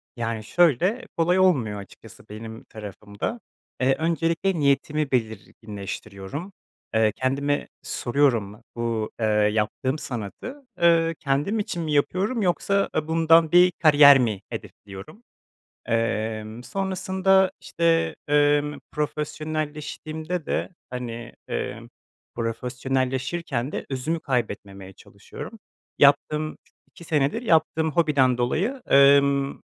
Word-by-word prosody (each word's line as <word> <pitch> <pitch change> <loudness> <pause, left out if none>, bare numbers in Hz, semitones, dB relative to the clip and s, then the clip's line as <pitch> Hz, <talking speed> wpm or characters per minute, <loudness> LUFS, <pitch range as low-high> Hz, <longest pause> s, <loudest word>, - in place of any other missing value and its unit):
Yani, 115 -2 -3
şöyle, 175 - +2
kolay 175 +3 +3
olmuyor 130 - +2
açıkçası 110 +2 -14
benim 110 +1 -9
tarafımda, 105 - -6 0.4
eee, 135 +1 +3
öncelikle 165 +3 0
niyetimi 145 +1 +1
belirginleştiriyorum, 110 - -5 0.4
eee, 110 -1 +3
kendime 140 +2 -1 0.2
soruyorum 120 -6 0
bu, 115 -2 -2
eee, 110 - +1
yaptığım 105 +5 +1
sanatı, 135 - -7 0.2
ııı, 165 -1 +4
kendim 145 +10 0
için 175 -4 -3
mi 155 - -3
yapıyorum 195 - +1
yoksa 200 +2 +1
a 155 0 -1
bundan 165 0 +4
bir 180 +1 +6
kariyer 145 -3 +8
mi 110 -6 0
hedefliyorum? 100 - -10 0.6
Emm, 110 0 -2
sonrasında, 190 +2 +1
işte, 165 -1 +1
emm, 145 0 +2
profesyonelleştiğimde 155 +2 -4
de, - - -1 0.2
hani, 120 -2 -6 0.2
eee, - - -4 0.5
profesyonelleşirken 130 +4 -2
de - - -4
özümü 145 +5 -2
kaybetmemeye 100 -6 -3
çalışıyorum. 100 - -11 0.4
Yaptığım 150 +2 +3 0.3
2 170 - -14
senedir 155 - 0
yaptığım 160 -5 +2
hobiden 140 -6 +3
dolayı, 195 - -1
ımm, 140 0 +4
140 Hz, 100 wpm, -24 LUFS, 115-165 Hz, 0.6 s, kariyer